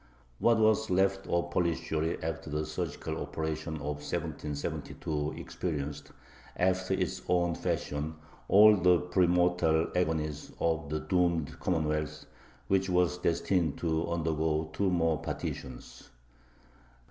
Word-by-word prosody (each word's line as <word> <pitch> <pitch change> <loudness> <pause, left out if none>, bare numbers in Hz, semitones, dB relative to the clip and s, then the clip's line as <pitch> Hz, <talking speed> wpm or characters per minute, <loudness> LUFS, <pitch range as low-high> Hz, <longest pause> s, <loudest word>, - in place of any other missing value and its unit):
What 115 -1 +4
was 110 0 +3
left 95 +1 +2
of 85 0 0
Polish 85 -2 0
Jewry 80 +1 0
after 80 0 -4
the 75 +1 -1
surgical - - -4
operation 80 0 -3
of 75 -1 -4
1772 75 +1 -3
experienced, 75 -3 -4 0.5
after 95 +1 +1
its - - -2
own 85 -1 +2
fashion, 75 0 -2 0.3
all 105 +2 +8
the 90 0 +5
pre 90 0 +2
mortal 90 -2 +3
agonies 75 -4 -1
of 80 -2 0
the 75 +1 -2
doomed 85 -5 0
commonwealth, 75 -3 -1 0.4
which 95 0 +2
was 90 0 +2
destined 85 -2 +1
to 80 -1 0
undergo 80 -1 0
two 95 +5 +1
more 80 -3 +1
partitions. 65 -2 -6
80 Hz, 120 wpm, -30 LUFS, 75-90 Hz, 0.5 s, all